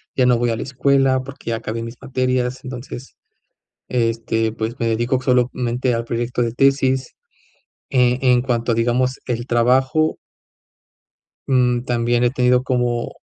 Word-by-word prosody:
ya 130 -1 +3
no 125 -1 +4
voy 120 0 0
a - - 0
la - - -5
escuela 135 0 +2
porque 135 -2 -9
ya - - 0
acabé 115 0 -5
mis 115 +1 -7
materias, 130 0 -1
entonces, 125 0 -8 0.7
este, 115 -2 0
pues, 115 +2 -4
me 115 - -1
dedico 120 +3 +1
solamente 125 -1 +1
al 115 0 -2
proyecto 120 +1 -2
de 115 -1 -1
tesis. 135 0 +1 0.8
Eh, 125 -1 +3
en 125 -2 +4
cuanto, 120 -2 0
digamos, 125 +3 +1
el 120 -1 -3
trabajo 130 +6 +2 1.3
mm, 125 -2 +2
también 120 0 0
he 120 - +4
tenido 125 -1 +2
como 125 -2 -1
125 Hz, 145 wpm, -20 LUFS, 120-130 Hz, 1.3 s, no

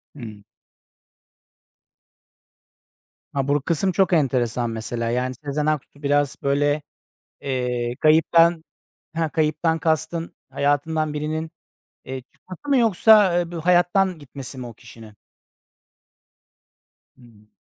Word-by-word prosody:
Hımm. 110 -6 -10 2.9
Ha, 135 -1 -1
bur 145 0 +1
kısım 170 +6 0
çok 190 0 +2
enteresan 125 -6 +1
mesela. 115 +1 -3
Yani, 125 +2 -1
Sezen 145 +1 -2
Aksu 150 -1 -3
biraz, 145 0 +1
böyle, 145 +2 +1 0.6
eee, 125 -3 -2
kayıptan 165 +1 +4 0.5
Ha, 165 -1 0
kayıptan 160 +1 0
kastın 160 +1 -1
hayatından 150 +2 0
birinin, 155 +2 -3 0.5
eee, 130 0 -6
çıkması 185 +11 -11
mı 275 - +4
yoksa 210 -5 +5
du 170 -2 -5
hayattan 180 +1 +2
gitmesi 135 -1 -9
mi 125 - -6
o 120 - -10
kişinin? 115 -1 -14 2.0
Hıı. 110 -4 -20
150 Hz, 100 wpm, -22 LUFS, 130-165 Hz, 2.9 s, yoksa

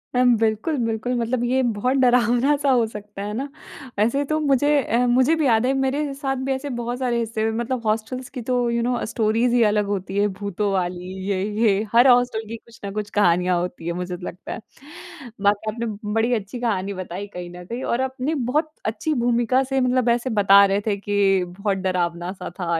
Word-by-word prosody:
अम, 245 -1 +5
बिल्कुल, 225 +7 0
बिल्कुल, 225 +2 -2
मतलब 235 +1 -1
ये 260 +2 +2
बहुत 245 +3 0
डरावना-सा 250 +3 +3
हो 245 -3 +4
सकता 210 -2 -9
है 210 - -4
ना? 265 +6 -3 0.5
वैसे 235 +7 +2
तो 310 - +2
मुझे 290 -1 +2
अ, 235 - 0
मुझे 260 +6 +4
भी 315 - 0
याद 230 -2 +3
है, 265 - +2
मेरे 275 +2 -1
साथ 270 -1 -2
भी - - 0
ऐसे 265 +2 -3
बहुत 240 +2 -3
सारे 245 -2 0
हिस्से 225 -1 -1
मतलब 235 +1 -3
हॉस्टल्स 225 +4 -2
की - - -3
तो 245 -1 +1
यू 235 0 0
नो 245 0 0
स्टोरीज़ 225 +2 +1
ही 235 - +5
अलग 210 0 +1
होती 190 0 -4
हैं। 205 0 +2
भूतों 200 +1 -2
वाली, 180 0 -2 0.2
ये 190 -1 0 0.2
ये, 205 -3 +3
हर 240 +3 +6
हॉस्टल 245 -3 +3
की 230 - -6
कुछ 230 0 -19
ना 200 - -4
कुछ 210 0 -4
कहानियाँ 180 -1 +3
होती 175 -1 -5
हैं, 170 - -1
मुझे 180 0 -4
तो 180 - -9
लगता 180 - -8
है। - - -6 0.9
बाकी 210 +1 +1
आपने 235 +2 -4 0.3
बड़ी 225 +2 +2
अच्छी 215 +1 -3
कहानी 200 -5 -1
बताई 185 +1 -6
कहीं 175 -1 -6
न 180 - -10
कहीं 235 +7 -5
और 235 - 0
आपने 265 +4 -2 0.2
बहुत 310 +2 0
अच्छी 225 +8 -1
भूमिका 240 +2 +2
से 270 0 -1
मतलब 250 -1 +2
ऐसे 240 +2 +1
बता 200 0 +7
रहे 200 +1 +1
थे 200 -1 +1
कि 195 -2 +2
बहुत 195 +2 -2
डरावना-सा 175 +1 -2
था 170 -2 0
230 Hz, 205 wpm, -22 LUFS, 200-255 Hz, 0.9 s, बता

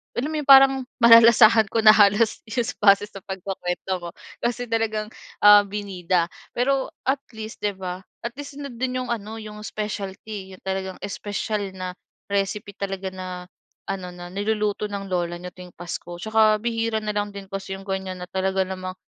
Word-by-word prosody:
alam 250 +4 -1
mo - - -3
yung 295 - -6
parang 270 0 +9 0.3
malalasahan 230 -1 +8
ko 230 - +1
na 215 - +10
halos 205 +2 +4
sa, 230 +1 -2
base 200 0 +6
sa 195 - -10
pagkukuwento 190 -1 -4
mo. 170 - -5 0.3
Kasi, 245 +1 -1
talagang 220 -2 0 0.4
ah, 205 0 +9
binida. 185 -4 -1 0.3
Pero, 265 +2 +1 0.2
at 270 +1 +1
least, 220 0 -7
'di 205 - +2
ba, 185 0 -5 0.2
at 235 - -4
least 285 0 -8
nandun 255 -2 -3
yung - - -9
ano 220 0 -6
yung 210 0 -9
specialty, 205 -1 -5
yung - - -20
talagang 190 -1 -3
special 205 +1 -3
na 185 -1 -5 0.4
recipe 200 +1 -2
talaga 195 -1 -4
na 185 0 -6 0.6
ano, 185 -2 -4
na 175 0 -9
niluluto 210 +1 -1
ng 200 -1 -5
lola 175 -1 -1
niyo 180 +1 -8
tuwing 180 -1 -12
pasko. 175 0 -7
Tsaka, 220 0 +4
bihira 230 -1 0
na 210 - -1
lang 205 0 -1
din 200 -1 -8
kasi 195 0 -5
yung - - -11
ganyan 190 -1 -3
na 180 - -6
talaga 190 0 0
namang, 185 0 -5
205 Hz, 175 wpm, -24 LUFS, 190-225 Hz, 0.6 s, na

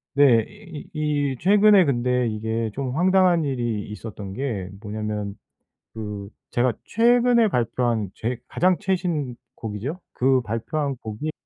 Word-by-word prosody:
네. 125 -6 +6
이 185 -8 -11
이 150 -2 0
이 130 - -5
최근에 205 0 +6
근데 125 -2 +1
이게 110 +1 -2
좀 135 -2 -3
황당한 180 -2 +4
일이 120 -6 -2
있었던 105 -2 -7
게 110 -7 -3
뭐냐면 105 -1 -4 0.6
그 105 -2 -6 0.2
제가 120 -1 +2
최근에 235 0 +4
발표한 115 - 0
제 120 +2 -3
가장 180 0 +2
최신곡이죠. 150 - -3
그 130 0 +3
발표한 135 +6 -2
곡이 110 +7 -5
125 Hz, 245 characters per minute, -24 LUFS, 110-170 Hz, 0.6 s, 네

